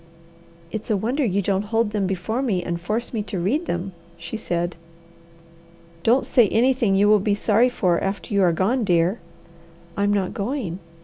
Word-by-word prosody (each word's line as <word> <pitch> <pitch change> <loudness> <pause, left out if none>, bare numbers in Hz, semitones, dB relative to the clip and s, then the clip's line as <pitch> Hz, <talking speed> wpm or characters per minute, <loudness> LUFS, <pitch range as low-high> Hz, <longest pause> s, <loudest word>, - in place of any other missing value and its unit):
"It's 220 -1 -5
a 215 - +2
wonder 245 +9 -1
you 200 -4 0
don't 195 +1 0
hold 225 0 0
them 205 -3 0
before 195 +6 -2
me 200 -9 0
and 170 -1 -3
force 220 +8 -3
me 220 - -1
to 205 -1 -5
read 275 - 0
them," 175 +3 -3 0.3
she 170 +6 -7
said. 175 -5 -2 1.3
"Don't 240 +8 +3
say 240 -4 +4
anything 240 -4 +2
you 200 +1 +4
will 210 0 +5
be 200 +1 +1
sorry 225 +4 +3
for 180 -8 +1
after 195 +2 -3
you 200 - +3
are 180 -2 +4
gone, 215 +9 +1
dear." 175 +1 +2 0.8
"I'm 200 0 +1
not 195 -3 0
going!" 200 - -3
205 Hz, 180 wpm, -23 LUFS, 185-225 Hz, 1.3 s, will